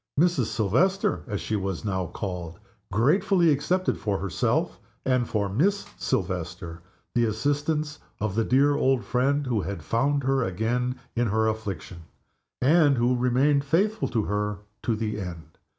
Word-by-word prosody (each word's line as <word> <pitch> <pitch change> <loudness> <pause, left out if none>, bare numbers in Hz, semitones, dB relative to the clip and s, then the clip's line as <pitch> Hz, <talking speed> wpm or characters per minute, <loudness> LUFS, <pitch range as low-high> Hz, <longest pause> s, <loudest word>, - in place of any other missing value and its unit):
Mrs. 170 -7 +3
Silvester 150 - +1
(as 105 - -3
she 110 - -2
was 95 -1 -3
now 95 -3 -1
called) 85 -2 -5 0.3
gratefully 165 - +3
accepted 180 +6 0
for 100 -2 -1
herself, 95 -2 -1 0.3
and 125 -2 +1
for 105 -2 0
Miss 180 - +1
Silvester, 85 -2 -3 0.3
the 120 -1 +3
assistance 145 +7 -1 0.2
of 105 -2 -1
the 115 +2 +1
dear 140 +5 +4
old 130 -4 +2
friend 135 +7 +1
who 120 -5 0
had 100 +1 -5
found 140 +4 +1
her 135 0 +2
again 120 +6 -1 0.2
in 120 0 +1
her 110 +1 +2
affliction, 100 -5 -4 0.6
and 145 -1 +5
who 120 +2 +2
remained 130 +4 +2
faithful 200 +10 +1
to 115 -3 0
her 105 0 -1 0.2
to 115 - 0
the 105 -1 -3
end. 85 -3 -8
120 Hz, 150 wpm, -26 LUFS, 100-145 Hz, 0.6 s, and